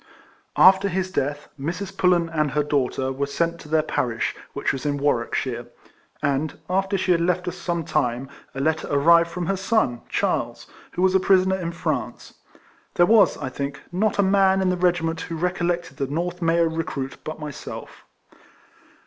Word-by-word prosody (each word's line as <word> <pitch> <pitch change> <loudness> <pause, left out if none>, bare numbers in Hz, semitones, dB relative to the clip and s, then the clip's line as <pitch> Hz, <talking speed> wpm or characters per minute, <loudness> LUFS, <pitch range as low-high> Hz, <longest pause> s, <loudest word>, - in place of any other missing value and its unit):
After 190 +1 +6
his 185 0 -2
death, 145 -2 -2
Mrs. 180 +7 -4
Pullen 180 -3 +3
and 155 -2 0
her 150 +1 0
daughter 135 -2 0
were 140 +1 -2
sent 170 +3 -1
to 150 - -12
their 155 0 +3
parish, 120 -6 -1 0.2
which - - -1
was 135 - -5
in 145 -1 0
Warwickshire; 125 -3 -1 0.6
and, 145 +2 0
after 195 +2 0
she 185 0 0
had 170 -1 +3
left 180 +1 0
us 180 - -3
some 170 -2 -3
time, 125 -3 -1 0.3
a - - -4
letter 160 +2 0
arrived 170 +4 +5
from 175 +1 -4
her 195 +3 0
son, 195 - 0
Charles, - - -1 0.3
who 180 - -1
was 190 0 +4
a 190 - +5
prisoner 190 0 +3
in 170 -2 -3
France. 170 - -4 0.6
There 175 - +5
was, 215 +1 +5
I 130 - -4
think, 140 +1 -5
not 200 +3 0
a 200 - +4
man 195 0 +4
in 190 -1 +2
the - - +1
regi 175 -1 +1
ment 165 0 -2
who 165 - -5
recollected 175 -4 -1
the 140 -2 -1
North 175 +5 -3
MayAo 165 -1 +2
re 165 - 0
cruit 135 -3 -5
but 155 0 -6
myself. 150 -3 -8
170 Hz, 185 wpm, -23 LUFS, 145-185 Hz, 0.6 s, After